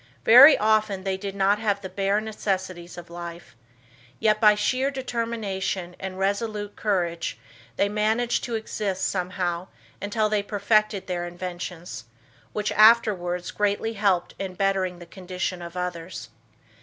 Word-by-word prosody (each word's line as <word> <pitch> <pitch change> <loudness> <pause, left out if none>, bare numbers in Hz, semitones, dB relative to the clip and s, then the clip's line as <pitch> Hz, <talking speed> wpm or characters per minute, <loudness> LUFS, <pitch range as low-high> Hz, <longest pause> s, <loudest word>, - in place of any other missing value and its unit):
Very 270 +6 +10
often 215 -3 +1
they 190 -1 -1
did 195 0 -6
not 200 +1 +2
have 205 -2 0
the - - -4
bare 195 +2 0
necessities 185 -5 -4
of 170 -1 -10
life, 170 -5 -9 0.6
yet, 215 0 +2
by 210 -1 +7
sheer 255 +6 +1
determination 225 -8 -3
and 190 -1 -6
resolute 205 +1 -2
courage, 175 -5 -1 0.4
they 200 - +2
managed 220 +3 0
to 235 - -3
exist 205 -3 -2
somehow 180 -1 -2 0.3
until 215 +2 0
they 210 -1 +1
perfected 205 -1 +1
their 175 -2 -3
inventions, 175 -7 -7 0.5
which 210 0 -2
afterwards 205 -6 +4
greatly 210 +2 0
helped 200 -4 +1
in 190 -2 -4
bettering 190 -2 0
the 175 - -11
condition 180 0 -5
of 170 +1 -8
others. 170 -8 -5
195 Hz, 135 wpm, -25 LUFS, 180-215 Hz, 0.6 s, Very